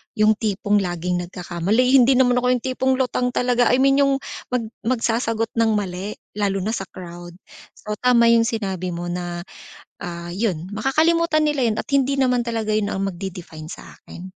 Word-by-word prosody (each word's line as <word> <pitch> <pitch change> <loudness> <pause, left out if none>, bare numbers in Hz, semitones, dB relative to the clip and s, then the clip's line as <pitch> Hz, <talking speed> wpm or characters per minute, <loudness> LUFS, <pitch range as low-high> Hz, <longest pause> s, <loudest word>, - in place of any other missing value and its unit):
yung 215 0 +4
tipong 205 -1 +1
laging 175 -1 -2
nagkakamali, 185 +8 0
hindi 265 0 +6
naman 250 -1 +4
ako 250 - -1
yung 240 - -5
tipong 260 0 +1
lutang 250 -1 -1
talaga, 245 -1 +2
I - - +4
mean 275 +1 +4
yung 275 -1 +4 0.3
mag 250 -2 -1 0.2
magsasagot 230 -2 0
ng 225 -1 +3
mali 195 0 -3 0.2
lalo 195 -2 0
na 215 - -1
sa 195 -5 -4
crowd. 175 -1 -10 0.4
So, 210 0 -6
tama 235 -2 +5
yung 230 -1 +4
sinabi 190 -6 -3
mo 175 0 -4
na, 175 -1 -4 0.6
ah, 175 -1 -6
'yon 190 -3 -2
makakalimutan 310 +7 +2
nila 280 -6 +1
'yon 215 - -1
at - - -4
hindi 275 0 +2
naman 250 -2 +2
talaga 225 -2 -2
'yon 215 -1 +1
ang 195 0 -2
magde-define 170 -4 -8
sa - - -10
akin. 175 - -12
220 Hz, 175 wpm, -22 LUFS, 180-250 Hz, 0.6 s, hindi